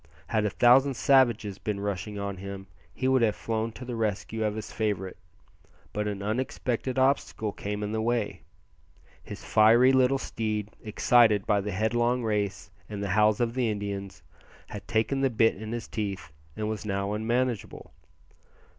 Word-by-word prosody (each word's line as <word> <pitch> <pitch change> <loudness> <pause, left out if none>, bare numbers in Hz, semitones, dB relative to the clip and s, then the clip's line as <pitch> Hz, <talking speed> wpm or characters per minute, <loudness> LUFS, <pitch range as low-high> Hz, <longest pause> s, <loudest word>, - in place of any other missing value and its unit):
Had 110 -2 +1
a - - +2
thousand 130 +5 +4
savages 120 -7 +3
been 105 -2 -3
rushing 100 0 -4
on 100 -1 -4
him 100 0 -7 0.3
he 130 +8 -2
would 130 -1 +3
have 110 -3 +2
flown 115 0 -2
to 125 - -9
the 120 -1 -4
rescue 110 0 -2
of 105 -1 -1
his 110 - -6
favourite; 100 -4 -2 0.8
but 105 0 -2
an 100 -1 -4
unexpected 125 +3 -2
obstacle 130 -5 +1
came 105 +1 -4
in 105 - -3
the 110 0 -1
way. 115 -2 -1 0.8
His - - -9
fiery 115 +4 +6
little 130 0 +4
steed, 110 -5 -3
excited 110 -1 +3
by 105 -2 +2
the 105 - -4
headlong 120 +5 +1
race 105 -3 -2 0.2
and 100 -1 -5
the 100 - -3
howls 105 +2 +3
of 120 -1 0
the 125 -2 0
Indians, 100 -2 -5 0.5
had 105 - -8
taken 115 +4 0
the 135 - +3
bit 115 -1 +3
in 110 +3 -7
his 120 -1 -4
teeth 100 -8 -4 0.3
and 110 - -2
was 110 -1 -3
now 100 -1 -2
unmanageable. 120 +1 -2
110 Hz, 165 wpm, -27 LUFS, 105-120 Hz, 0.8 s, fiery